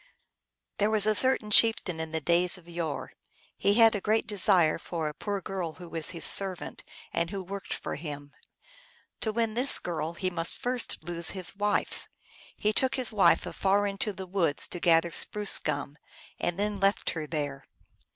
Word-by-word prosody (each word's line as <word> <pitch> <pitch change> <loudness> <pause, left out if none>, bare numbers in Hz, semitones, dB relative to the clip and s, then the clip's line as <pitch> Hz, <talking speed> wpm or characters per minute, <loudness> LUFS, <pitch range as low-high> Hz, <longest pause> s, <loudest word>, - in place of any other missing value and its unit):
THERE 205 +1 +2
was 215 -2 +2
a 215 - +3 0.4
chieftain 205 -6 +3
in 160 0 -5
the 160 - -2
days 175 +4 +2
of 175 -2 -18
yore. 170 -3 -5 0.4
He 200 +1 +1
had 225 0 +6
a 205 - -3
great 220 +3 0
desire 185 -6 +3
for 165 -2 -5
a 150 - -5
poor 200 +4 -5
girl 180 -3 -5
who 175 +1 -12
was 165 +1 +3
a 165 - -7
servant, 190 -3 +2 0.3
and 170 0 -1
who 195 0 -6
worked 195 +2 -8
for - - -6
him. 145 -2 -8 0.9
To 220 - -2
win 225 0 -2
this 250 +4 +6
girl 165 -2 -5
he 185 +2 -3
first - - -13 0.3
must 245 -8 0
lose 170 0 +1
his 185 0 +1
wife. 205 +1 -2 0.5
He 215 +1 0
took 260 +4 0
his 255 -4 0
wife 205 - +3
afar 200 +1 0
into 200 +1 -3
the 190 -1 -9
woods 175 -6 0
to 175 - -6
gather 170 0 +2
spruce 210 +3 +3
gum, 150 -1 -4 0.4
and 175 - -2
then 205 0 -2
left 195 +1 0
her 160 -2 -6
there. 145 -3 -5
185 Hz, 180 wpm, -27 LUFS, 165-205 Hz, 0.9 s, had